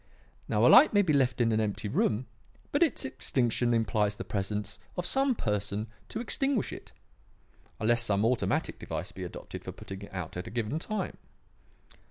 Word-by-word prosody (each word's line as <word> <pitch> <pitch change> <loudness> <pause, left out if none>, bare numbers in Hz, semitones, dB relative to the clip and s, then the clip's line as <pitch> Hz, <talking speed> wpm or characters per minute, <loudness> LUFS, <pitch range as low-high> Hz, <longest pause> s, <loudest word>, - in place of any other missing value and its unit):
Now - - +2
a - - +8
light 310 - +8
may 205 0 +5
be 160 -5 +2
left 130 -3 +2
in 115 -2 +3
an 110 - +2
empty 105 -1 -1
room, 110 +3 +1 0.5
but - - +1
its - - +3
extinction 120 -1 0
implies 105 -2 +1
the - - -5
presence 105 +1 -3 0.2
of 180 - -1
some 270 +2 +3
person 105 - -1 0.2
to 220 - -4
extinguish 270 -1 0
it; - - -10 0.9
unless 120 +2 +3
some 105 -2 +2
automatic 125 +1 0
device 95 +3 -5
be 95 -2 -7
adopted 90 - -7
for - - -5
putting 95 0 -9
it 100 - -10
out 90 -4 -5
at 90 - -5
a - - -5
given 120 +5 -2
time. 215 +5 -3
110 Hz, 180 wpm, -29 LUFS, 105-130 Hz, 0.9 s, a